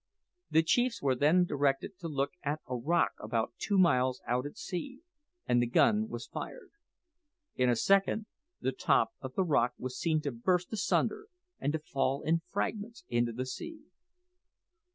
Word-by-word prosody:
The 160 - +4
chiefs 245 +8 +2
were 135 -2 +2
then 155 +7 +4
directed 145 +5 0
to 170 - -5
look 140 -2 -1
at 150 +2 -2
a 125 - -3
rock 165 +8 +2
about 115 +2 -2
two 205 - 0
miles 130 -8 +3
out 125 +3 0
at 145 - -11
sea, 260 - -5 0.4
and 120 - +3
the 120 - +1
gun 215 - +3
was - - -5
fired. - - -7 0.8
In 125 -1 +2
a 120 - +4
second 195 - +2 0.3
the - - 0
top - - +2
of - - -7
the 195 - +2
rock 125 -8 +2
was 130 0 -5
seen 160 -2 +2
to 145 -2 -2
burst 180 - 0
asunder, 420 - 0 0.3
and 145 - 0
to - - +1
fall 135 -2 -1
in 165 +2 +2
fragments 215 +1 -3
into 120 0 +1
the 125 +3 -3
sea. 325 - -7
150 Hz, 170 wpm, -31 LUFS, 130-195 Hz, 0.8 s, The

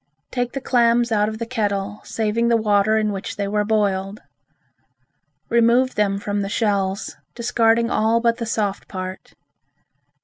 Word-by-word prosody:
Take 245 -1 -2
the 275 - -4
clams 240 -2 +2
out 210 -1 +2
of 220 - -6
the 230 - -4
kettle, 205 -4 -2
saving 225 +1 -1
the 235 -1 +4
water 215 0 +2
in 215 -1 +1
which 195 -1 -5
they 200 -1 -2
were 210 +1 0
boiled. 205 -2 0 1.3
Remove 235 +2 +3
them 200 -1 +1
from 205 0 -2
the 195 - -3
shells, 200 -2 -1 0.2
discarding 230 -1 +2
all 225 +2 +2
but 230 0 +1
the 230 -2 -4
soft 205 -3 -2
part. 185 -1 -7
215 Hz, 150 wpm, -21 LUFS, 200-235 Hz, 1.3 s, the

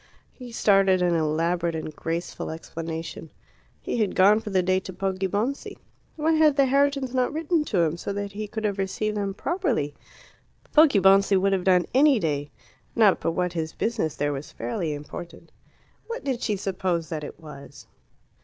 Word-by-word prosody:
He 250 -2 -10
started 195 -4 +3
an 175 -1 +2
elaborate 165 +2 0
and 155 -1 -5
graceful 165 +3 -4
explanation. 165 0 -6 0.5
He - - -3
had 215 -4 0
gone 205 +3 +6
for 220 - -7
the 190 -2 +2
day 185 +1 +2
to 190 - -8
Poggibonsi. 195 +7 -2 0.4
Why 315 +1 +1
had 310 -2 +4
the 275 -1 +4
Herritons 275 -1 +1
not 255 -1 +1
written 320 +1 0
to 190 -10 +1
him, 165 0 0
so 185 - -4
that 200 0 -4
he 210 +1 -5
could 220 +1 -5
have 205 -2 -1
received 210 +2 -2
them 200 -2 -2
properly? 275 - -1 0.8
Poggibonsi 195 - +5
would 195 +1 +2
have 185 -2 -1
done 180 -2 +4
any 275 +1 +5
day; 145 -6 -2 0.5
not 215 -4 +4
but 165 - -1
what 180 0 -1
his 160 -2 -3
business 215 -10 -1
there 145 0 -1
was 140 +1 -7
fairly 150 +7 -3
important. 150 +4 -9 0.6
What 470 +1 -5
did 260 -3 -2
she 210 - 0
suppose 185 -4 -2
that 155 -2 -4
it 145 - -8
was? 140 -5 -12
190 Hz, 170 wpm, -25 LUFS, 165-230 Hz, 0.8 s, gone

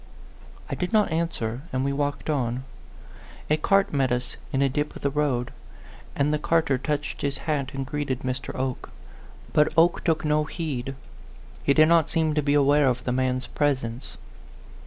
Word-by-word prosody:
I - - -5
did 180 +1 -2
not 210 -5 +3
answer, 135 -8 -2
and 130 +1 0
we 140 - 0
walked 145 0 -2
on. 130 -4 -1 0.9
A 155 - +5
cart 195 +4 +2
met 135 -3 +2
us 125 0 -2 0.2
in 135 0 +2
a - - +4
dip 145 +3 -2
of - - -10
the 140 - +1
road, 135 -4 0 0.6
and 145 +1 +1
the 150 - +1
carter 155 -4 +2
touched 145 +2 -3
his 140 -1 -1
hat 140 -4 -1
and 135 0 -3
greeted 140 -2 -3
Mr. 130 0 -3
Oke. 130 -1 -3 0.6
But 150 - +4
Oke 170 +2 +4
took 160 -2 +1
no 150 0 +2
heed; 135 -5 -4 0.7
he 140 - +3
did 155 0 +7
not 165 -2 +4
seem 160 -2 +1
to 150 - +1
be 145 0 +2
aware 145 0 +4
of 125 -1 0
the 125 - -1
man's 130 0 0
presence. 130 -4 -2
145 Hz, 180 wpm, -25 LUFS, 130-155 Hz, 0.9 s, did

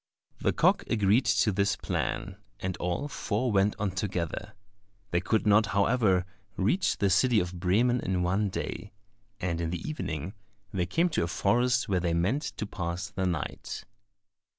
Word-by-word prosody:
The - - +2
cock - - +3
agreed 105 +3 +3
to 105 - +3
this 100 0 +1
plan, 100 0 -3 0.2
and 95 -1 -3
all 90 +11 -2
four 125 -3 -1
went 100 +1 +3
on 100 -2 -1
together. 95 +1 -3 0.6
They 85 - +2
could 110 +3 +1
not, 105 +1 +5
however, 100 -4 +3 0.3
reach 175 - +1
the 100 -2 +2
city 115 +5 +4
of 90 0 -3
Bremen 115 +8 +2
in 90 -3 -1
one 95 +3 +1
day, 100 +2 -5 0.5
and 85 -2 -2
in 80 - -1
the 85 0 -4
evening 95 - -4 0.4
they 90 -3 0
came 170 - +2
to 155 - 0
a - - -1
forest 120 +8 +2
where 95 -3 +1
they 85 -1 0
meant 100 - +1 0.2
to - - -2
pass 90 -2 -4
the 95 -1 -1
night. 85 -4 -4
100 Hz, 165 wpm, -29 LUFS, 90-110 Hz, 0.6 s, not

